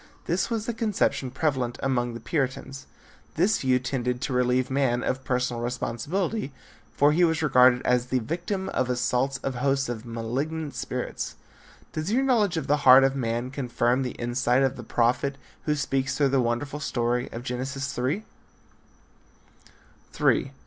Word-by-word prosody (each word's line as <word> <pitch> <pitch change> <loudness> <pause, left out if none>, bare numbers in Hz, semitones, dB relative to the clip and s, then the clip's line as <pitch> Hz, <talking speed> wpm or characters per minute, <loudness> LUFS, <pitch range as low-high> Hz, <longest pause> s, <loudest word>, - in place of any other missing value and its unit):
This 180 +6 0
was 225 -2 -2
the 235 - -2
conception 210 - 0
prevalent 130 -3 -1
among 120 -3 0
the - - -6
Puritans. 135 0 -3 0.5
This 195 +7 +2
view 130 -1 +3
tended 125 -1 -2
to 135 - -2
relieve 125 +1 +1
man 130 -3 +1
of 130 +1 -2
personal 125 -2 -1
responsibility 140 - -2 0.4
for 145 +1 +4
he 170 +4 +3
was 160 -2 +2
regarded 125 -3 +5
as 125 0 +2
the 130 - +1
victim 175 - -3
of 130 -1 -1
assaults 125 +2 0
of 135 - -1
hosts 135 +1 0
of 115 -2 -4
malignant 135 +7 -3
spirits. - - -4 0.6
Does 155 +5 -2
your 255 +4 +2
knowledge 215 -10 +2
of 160 - -2
the 145 - +2
heart 135 -1 +8
of 135 0 +2
man 120 0 -2
confirm 125 -1 0
the 125 -2 -3
insight 120 +2 +1
of 135 0 +1
the - - -7
prophet 120 +4 0 0.3
who 150 - +1
speaks 135 -1 -1
through 140 -2 +3
the 135 -1 +2
wonderful 125 +5 -2
story 120 -3 -1
of 115 - -6
Genesis 135 +2 -3
3? 135 +12 -1 2.0
III. - - +2
130 Hz, 160 wpm, -26 LUFS, 125-150 Hz, 2.0 s, heart